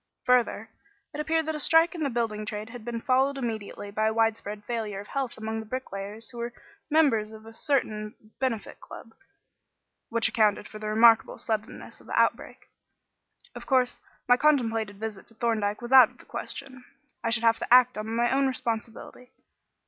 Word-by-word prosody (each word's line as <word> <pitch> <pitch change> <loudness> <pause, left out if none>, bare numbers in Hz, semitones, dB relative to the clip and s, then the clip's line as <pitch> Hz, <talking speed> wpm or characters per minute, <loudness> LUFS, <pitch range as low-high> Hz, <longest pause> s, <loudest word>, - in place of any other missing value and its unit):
Further, 235 -3 +2 0.4
it 295 - -6
appeared 320 +1 0
that 315 - -2
a 300 - -4
strike 325 +3 +4
in 340 - -6
the 285 - +1
building 225 -3 -2
trade 210 +1 -5
had 245 -2 -9
been 230 0 -4
followed 265 +3 +2
immediately 220 -4 -5
by 215 +1 0
a 220 - +1
widespread 220 -2 -1
failure 220 -4 -3
of 200 - -8
health 270 -3 -3
among 220 0 -4
the 220 - -7
bricklayers 215 -3 -6
who 240 - -9
were 235 +1 -4 0.4
members 275 -9 +3
of 220 0 -12
a 225 - -11
certain 220 -6 -1 0.2
benefit 240 -6 -3
club; 225 - -12 1.0
which 230 0 +2
accounted 210 -2 +2
for 215 - -10
the 215 - -5
remarkable 225 +1 +5
suddenness 220 0 -5
of - - -19
the - - 0
outbreak. - - 0 0.9
Of - - -10
course, 255 -3 +1 0.3
my 245 - +6
contemplated 225 -8 +1
visit 215 -3 -6
to 225 - -18
Thorndyke 220 -1 -1
was 240 - -6
out 260 -4 +9
of - - -24
the - - -17
question. 255 -1 -7 0.4
I 230 - 0
should 230 0 +1
have 230 0 +4
to - - -6
act 250 0 +7
on 215 +1 -5
my 235 +2 +1
own 270 0 +3
responsibility. 235 0 -5
230 Hz, 185 wpm, -27 LUFS, 215-255 Hz, 1.0 s, out